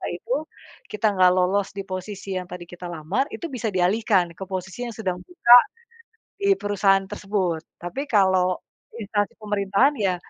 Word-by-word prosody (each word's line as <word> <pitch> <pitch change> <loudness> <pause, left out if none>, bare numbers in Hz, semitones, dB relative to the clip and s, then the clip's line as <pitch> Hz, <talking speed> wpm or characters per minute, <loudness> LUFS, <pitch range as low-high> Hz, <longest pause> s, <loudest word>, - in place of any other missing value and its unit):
itu, 480 - -10 0.6
kita 210 +1 -3
nggak 185 -1 +6
lolos 190 +2 +2
di 195 - -3
posisi 190 +1 -7
yang 180 - -5
tadi 180 -1 -7
kita 175 +1 -9
lamar, 175 - -2
itu 340 - -7
bisa 240 -3 -3
dialihkan, 185 -1 +2
ke - - -6
posisi 185 +2 -5
yang 230 - -7
sedang 185 -5 -3
buka 245 - +5 0.8
di 400 0 +4
perusahaan 195 -1 +2
tersebut. 195 -5 -2 0.2
Tapi 175 +11 -5
kalau, 190 -3 +3 0.4
instansi 205 -1 -1
pemerintahan 205 +5 +2
ya, 190 -3 +1
195 Hz, 150 wpm, -24 LUFS, 180-210 Hz, 0.8 s, nggak